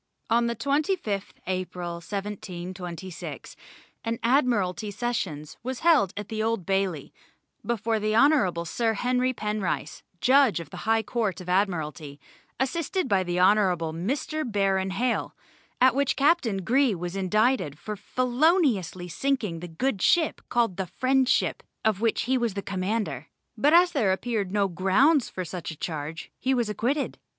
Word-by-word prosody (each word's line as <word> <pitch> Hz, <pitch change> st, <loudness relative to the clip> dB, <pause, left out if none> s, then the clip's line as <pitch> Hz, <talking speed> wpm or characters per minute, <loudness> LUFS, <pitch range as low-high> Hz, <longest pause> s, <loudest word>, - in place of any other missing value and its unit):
On 235 Hz, +1 st, +3 dB
the 235 Hz, -, -1 dB
25th 275 Hz, -, -1 dB
April, 180 Hz, -2 st, -3 dB
1726, 185 Hz, -2 st, -6 dB, 0.5 s
an 230 Hz, 0 st, -2 dB
Admiralty 230 Hz, -6 st, +1 dB
Sessions 190 Hz, -10 st, -3 dB
was 255 Hz, +1 st, -5 dB
held 315 Hz, -, +4 dB
at 205 Hz, -1 st, -5 dB
the 220 Hz, 0 st, -3 dB
Old 225 Hz, -5 st, -1 dB
Bailey, 195 Hz, -6 st, -1 dB, 0.5 s
before 230 Hz, -1 st, 0 dB
the 215 Hz, +1 st, 0 dB
Hon. 230 Hz, -, +4 dB
Sir 225 Hz, +6 st, 0 dB
Henry 250 Hz, +3 st, +1 dB
Penrice, 210 Hz, -5 st, -3 dB, 0.2 s
Judge 260 Hz, -4 st, +4 dB
of 170 Hz, -, -9 dB
the 190 Hz, +3 st, -6 dB
High 225 Hz, 0 st, +3 dB
Court 215 Hz, -8 st, -1 dB
of 180 Hz, -1 st, -8 dB
Admiralty, 160 Hz, -6 st, -1 dB, 0.4 s
assisted 335 Hz, +5 st, -1 dB
by 195 Hz, -5 st, +3 dB
the 175 Hz, -1 st, -1 dB
Honourable 180 Hz, -4 st, +3 dB
Mr. 275 Hz, -, -2 dB
Baron 195 Hz, -5 st, 0 dB
Hale, 235 Hz, +6 st, -1 dB, 0.4 s
at 255 Hz, 0 st, +6 dB
which 280 Hz, 0 st, +1 dB
Captain 265 Hz, -, +2 dB
Greagh 255 Hz, -1 st, +3 dB
was 175 Hz, +1 st, -5 dB
indicated 195 Hz, -, +1 dB
for 210 Hz, +5 st, -6 dB
feloniously 250 Hz, -, +1 dB
sinking 210 Hz, -3 st, -1 dB
the 175 Hz, -, -7 dB
good 195 Hz, +5 st, -2 dB
ship 335 Hz, -3 st, +3 dB
called 230 Hz, -6 st, +1 dB
the 190 Hz, -2 st, -2 dB
Friendship, 260 Hz, +7 st, +1 dB, 0.2 s
of 215 Hz, -2 st, +2 dB
which 230 Hz, -1 st, +1 dB
he 260 Hz, +1 st, +1 dB
was 235 Hz, -4 st, 0 dB
commander; 200 Hz, +2 st, -2 dB, 0.3 s
but 290 Hz, -, +3 dB
as 350 Hz, +2 st, +6 dB
there 230 Hz, -, +2 dB
appeared 205 Hz, -1 st, -1 dB
no 200 Hz, -1 st, +2 dB
grounds 195 Hz, -, +3 dB
for 185 Hz, -, -5 dB
such 175 Hz, 0 st, -6 dB
a 160 Hz, -, -7 dB
charge, 155 Hz, 0 st, -5 dB
he 265 Hz, +1 st, +1 dB
was 240 Hz, -3 st, 0 dB
acquitted. 250 Hz, +8 st, -1 dB
210 Hz, 145 wpm, -26 LUFS, 185-255 Hz, 0.5 s, at